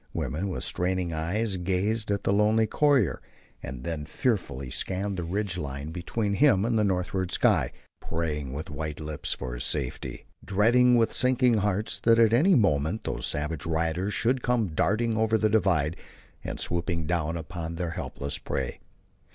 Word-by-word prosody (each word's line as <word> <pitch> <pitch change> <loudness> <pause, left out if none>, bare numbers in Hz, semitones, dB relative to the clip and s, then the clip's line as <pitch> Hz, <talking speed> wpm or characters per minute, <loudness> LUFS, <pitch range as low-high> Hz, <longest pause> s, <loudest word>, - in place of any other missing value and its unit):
Women 90 +6 -2
with 90 - -3
straining 90 -1 -1
eyes 95 +6 -1
gazed 95 +5 -1
at 100 -1 0
the 100 - +2
lonely 105 +2 +3
courier, 140 - +2 0.4
and 60 0 -7
then 80 -2 -4
fearfully 75 - -1
scanned 95 +1 -3
the 90 - -2
ridge 95 +1 -2
line 70 +1 -5
between 100 +5 -2
him 110 -4 +4
and 115 0 +1
the - - +3
northward 95 -1 -1
sky; - - +2 0.3
praying 75 -5 -3
with 75 +3 -6
white 75 0 -4
lips 75 -1 -3
for 65 -2 -5
his - - -4
safety; 65 -3 -3 0.2
dreading 120 +5 +4
with 115 -1 +2
sinking 125 -2 +3
hearts 105 +1 -1
that 115 0 +4
at 115 -1 +5
any 170 +10 +5
moment 90 - +2
those - - -2
savage 75 +2 -2
riders 85 +5 -1
should 125 +2 +1
come 120 -5 +1
darting 110 +7 +1
over 110 0 +2
the 110 0 +2
divide 85 -8 +2 0.5
and - - -5
swooping 85 -1 0
down 85 -1 -1
upon 80 +1 -5
their 85 0 -3
helpless 70 -3 -5
prey. 65 -2 -3
95 Hz, 165 wpm, -27 LUFS, 80-110 Hz, 0.5 s, at